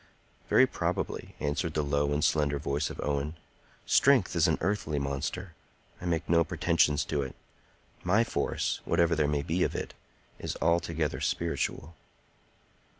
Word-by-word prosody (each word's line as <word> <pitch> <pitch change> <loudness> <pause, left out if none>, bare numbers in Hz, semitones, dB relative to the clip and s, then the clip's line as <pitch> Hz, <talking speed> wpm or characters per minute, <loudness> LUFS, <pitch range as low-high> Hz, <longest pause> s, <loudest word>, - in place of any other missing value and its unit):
"Very - - +6
probably," - - -3
answered 75 +3 -2
the 75 - +1
low 70 0 +1
and 75 +1 0
slender 75 -2 +2
voice 70 +2 -1
of - - -9
Owen. 75 +2 -1 0.5
"Strength 130 -10 +4
is 85 +1 +4
an 80 - +2
earthly 90 -5 -1
monster. 70 +6 -3 0.5
I - - -6
make 85 -1 -1
no 85 0 +4
pretensions 75 -1 +2
to 75 -2 -1
it. 65 -2 -5 0.7
My 100 +6 +3
force, - - -1
whatever 85 0 +2
there 75 -2 +2
may 75 -1 0
be 85 +5 -1
of - - +1
it, - - -4 0.5
is - - -4
altogether 85 -2 0
spiritual." 85 -1 -2
80 Hz, 150 wpm, -29 LUFS, 75-85 Hz, 0.7 s, Very